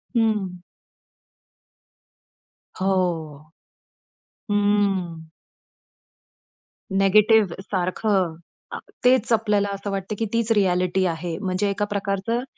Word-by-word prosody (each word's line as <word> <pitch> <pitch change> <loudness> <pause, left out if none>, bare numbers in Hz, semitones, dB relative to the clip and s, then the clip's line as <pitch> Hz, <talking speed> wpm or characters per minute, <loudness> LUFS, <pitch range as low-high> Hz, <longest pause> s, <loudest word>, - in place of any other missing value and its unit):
हं. 205 -6 0 2.2
हो. 165 -5 -1 1.0
हम्म 200 -5 +1 1.7
निगेटिव्ह 200 0 +4
सारखं. 185 -2 -1 0.4
आ - - -3 0.3
तेच 250 -2 +4
आपल्याला 210 -2 +1
असं 200 0 -5
वाटतं 195 +2 -3
की 225 - 0
तीच 230 0 0
रिअ‍ॅलिटी 185 -2 +2
आहे. 165 0 -3
म्हणजे 190 +1 -1
एका 205 +1 -1
प्रकारचं, 205 +4 -2
195 Hz, 80 wpm, -23 LUFS, 180-210 Hz, 2.2 s, निगेटिव्ह